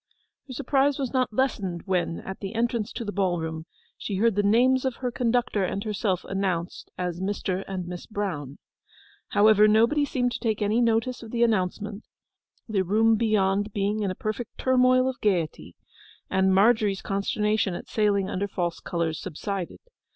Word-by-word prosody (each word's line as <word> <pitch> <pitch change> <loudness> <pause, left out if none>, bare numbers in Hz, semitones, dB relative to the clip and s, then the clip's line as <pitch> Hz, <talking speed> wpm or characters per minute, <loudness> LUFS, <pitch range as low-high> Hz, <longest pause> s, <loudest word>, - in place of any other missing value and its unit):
Her 260 - -7
surprise 275 +2 +1
was 270 -3 -3
not 255 -2 +1
lessened 205 -8 -1
when, 180 -3 -1
at 190 - -7
the 200 +2 -6
entrance 230 -2 0
to 230 - -5
the 205 - -3
ballroom, 170 -4 -2 0.3
she 200 - -4
heard 225 +4 +3
the 205 - +2
names 245 +6 +3
of 260 -3 -1
her 250 -1 -3
conductor 240 -3 0
and 195 +2 -2
herself 205 -4 -1
announced 190 -3 -3
as 180 -1 -3
'Mr. 190 -1 -2
and 185 -2 -4
Miss 175 0 -7
Brown.' 175 - -4 0.7
However, 210 0 +5
nobody 230 +8 +4
seemed 250 -3 0
to - - -4
take 220 -3 -1
any 215 +3 +1
notice 230 +2 +1
of 230 - -9
the 235 +1 +1
announcement, 210 0 -1 0.6
the 210 -4 +1
room 220 +4 +3
beyond 205 -2 +1
being 205 +1 0
in 200 - 0
a 185 - -3
perfect 215 +3 -5
turmoil 255 0 +3
of 260 -1 -4
gaiety, 180 -7 -1 0.6
and 190 0 +3
Margery's 205 0 +3
consternation 205 0 0
at - - -8
sailing 205 -3 +1
under 200 +1 -2
false 175 -3 -3
colours 165 -2 -2
subsided. 185 +3 -5
210 Hz, 165 wpm, -26 LUFS, 190-230 Hz, 0.7 s, However